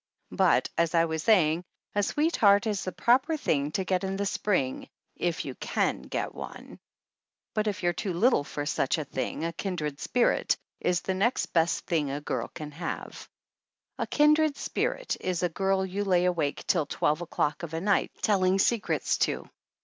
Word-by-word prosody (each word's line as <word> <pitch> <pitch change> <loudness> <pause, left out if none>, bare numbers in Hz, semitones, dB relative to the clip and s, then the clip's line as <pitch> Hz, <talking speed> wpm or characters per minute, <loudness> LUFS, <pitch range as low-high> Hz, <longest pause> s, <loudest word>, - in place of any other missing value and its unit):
But - - +3
as 170 0 +2
I 165 0 +5
was 160 -1 -2
saying, 170 -5 +3 0.3
a 205 - +2
sweetheart 210 -6 +3
is 210 -3 -1
the 185 - -2
proper 260 - +2
thing 145 - 0
to 190 - 0
get 185 0 0
in 195 0 -2
the 200 - -1
spring 180 -10 -1 0.3
if 175 -2 -2
you 135 - -4
can - - -1
get 65 - -4
one; - - -9 0.7
but 215 0 0
if 205 -2 -2
you're 175 0 +2
too 190 +3 -3
little 210 - +3
for 145 0 -5
such 140 -1 0
a 155 - -3
thing 135 +4 -3
a 165 - -2
kindred 155 -6 -3
spirit 245 -1 +1 0.2
is 175 -1 +1
the 190 - -2
next 210 +7 0
best 165 0 +2
thing 155 -5 0
a 140 +1 -3
girl 150 - -3
can 150 -1 -7
have. 165 +3 -6 0.7
A - - -1
kindred 300 0 +3
spirit - - -2
is 180 -1 -2
a 180 - +2
girl 190 +2 0
you 195 +2 -2
lay 180 -3 +3
awake 165 -5 -1
till 160 -6 +1
twelve 150 +3 0
o'clock 150 -3 -1
of 165 -2 -5
a - - -1
night 200 +3 +2
telling 190 -2 +3
secrets 220 +2 +1
to. - - 0
180 Hz, 180 wpm, -28 LUFS, 160-205 Hz, 0.7 s, I